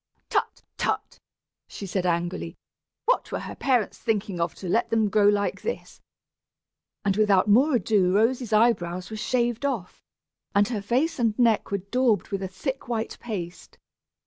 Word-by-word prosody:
"Tut, - - -1 0.2
tut," - - -2 0.5
she 200 - -8
said, 185 -1 -1
angrily; 175 +1 -2 0.5
"what - - +1
were - - -2
her - - -6
parents 250 -6 0
thinking 205 -5 -1
of 170 -1 -1
to 190 - -7
let 225 +7 +1
them 220 -2 +2
grow 210 -1 +4
like 205 0 +1
this?" 470 - -5 1.0
And 195 -1 +2
without 205 -2 +3
more 260 +8 +5
ado 205 -6 +2
Rosy's 230 +3 +1
eyebrows 185 -5 +2
were 215 - -5
shaved 240 +2 0
off, 240 -11 -3 0.5
and 200 0 +4
her 220 -5 -2
face 250 +11 0
and 225 -3 +1
neck 230 -3 +3
were 200 - 0
daubed 250 -7 +2
with 195 -1 -3
a 190 - -2
thick 260 +10 -5
white 230 -2 -3
paste. 180 -7 -6
215 Hz, 160 wpm, -25 LUFS, 195-240 Hz, 1.0 s, more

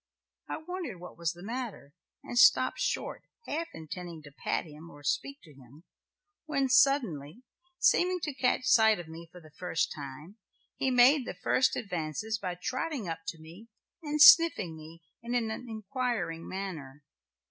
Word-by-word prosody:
I - - -3
wondered 320 - -6
what 180 - -10
was 170 -1 -2
the 175 +1 -13
matter 230 - -6 0.3
and - - -7
stopped - - +5
short - - -2 0.2
half 325 +3 -3
intending 165 0 -8
to 145 - -12
pat 140 - -2
him 155 +1 -12
or 145 -2 -14
speak 275 - -1
to 155 - -16
him, 135 +4 -17 0.6
when 275 -3 0
suddenly, 240 - +2 0.3
seeming 365 -6 +3
to 295 - -3
catch 255 -1 0
sight 220 -3 +5
of 175 -2 -8
me 165 +1 -10
for 180 - -12
the 155 -3 -17
first 180 -2 -1
time, 150 - -9 0.4
he 265 - 0
made 255 +2 +5
the - - -5
first 255 - +3
advances 195 +3 -3
by 180 -3 -4
trotting 255 - -3
up 165 -1 -4
to 165 - -4
me 170 +8 -13 0.3
and 300 -1 -3
sniffing 305 - +7
me 160 +2 -13 0.2
in 235 +1 -3
an 225 -2 0
inquiring 220 -6 -4
manner. 155 -8 -6
195 Hz, 160 wpm, -30 LUFS, 160-255 Hz, 0.6 s, sniffing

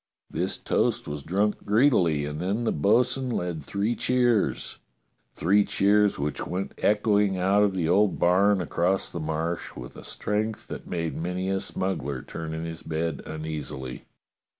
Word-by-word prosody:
This - - -1
toast - - 0
was 75 0 -4
drunk 100 +7 0
greedily, 100 - +3
and 75 +1 -5
then 100 +7 -1
the 115 - +1
bo'sun 125 - +2
led 90 -8 -2
three 100 +10 -1
cheers 120 -4 +1 0.3
— - - -46
three 100 +4 +4
cheers 105 +1 +3
which 75 +1 -2
went 95 +2 -3
echoing 105 -2 +2
out 95 +3 +3
of 100 -2 +2
the 85 -4 0
old 100 +3 +3
barn 95 +2 +4
across 90 +3 0
the 85 - -4
Marsh 80 +2 -3
with 60 -1 -9
a - - -10
strength 105 +1 -2
that - - -7
made 85 -2 -2
many 90 +3 -2
a 95 - +1
smuggler 70 -10 -3
turn 80 -1 -6
in 80 +1 -4
his 80 0 -6
bed 80 -1 -2
uneasily. 75 -5 -6
90 Hz, 160 wpm, -26 LUFS, 80-105 Hz, 0.3 s, three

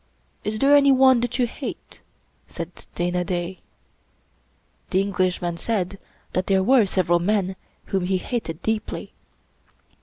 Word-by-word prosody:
"Is 210 +1 -2
there 280 +4 +5
anyone 265 -3 +6
that 245 +1 -2
you 250 - +3
hate?" 235 - -8 0.5
said 170 0 -8
Dana 175 +1 0
Da. 180 0 -3 1.3
The 190 - +2
Englishman 185 -3 0
said 195 -2 -2 0.3
that 185 - -1
there 190 -1 +3
were 240 -1 +5
several 175 -2 +2
men 190 0 0 0.3
whom 190 -2 -1
he 190 +1 +1
hated 180 -6 -4
deeply. 220 -1 -3
190 Hz, 125 wpm, -23 LUFS, 180-230 Hz, 1.3 s, anyone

